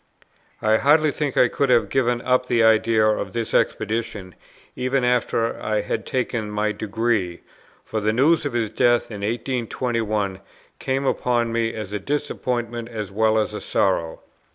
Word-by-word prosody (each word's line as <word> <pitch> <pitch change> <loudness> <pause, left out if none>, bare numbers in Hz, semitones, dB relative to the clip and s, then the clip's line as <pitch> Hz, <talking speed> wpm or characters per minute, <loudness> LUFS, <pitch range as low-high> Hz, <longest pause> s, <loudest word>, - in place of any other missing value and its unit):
I 110 0 +4
hardly 150 +4 +4
think 145 -2 -3
I 125 - +6
could 140 +3 -1
have 120 -2 +4
given 120 -2 +1
up 125 0 +2
the 120 -2 +2
idea 110 0 +4
of 105 -3 0
this 115 -1 -3
expedition, 105 -4 -1 0.4
even 130 +1 0
after 120 -2 0
I 105 -1 0
had 105 +1 -4
taken 120 -4 -2
my 105 0 0
degree; 105 -4 -1 0.4
for 110 - -3
the 105 +1 +1
news 150 +8 +3
of 145 -4 -3
his 115 -3 -1
death 120 +1 +2
in 105 -2 -6
1821 115 -3 -2 0.4
came 135 +1 -1
upon 120 -3 0
me 115 0 -1
as 105 -2 -6
a 105 - -2
disappointment 120 -3 -3
as 105 -4 -5
well 110 +2 +2
as 105 -1 0
a 105 - -5
sorrow. 85 -4 0
115 Hz, 160 wpm, -22 LUFS, 105-125 Hz, 0.4 s, I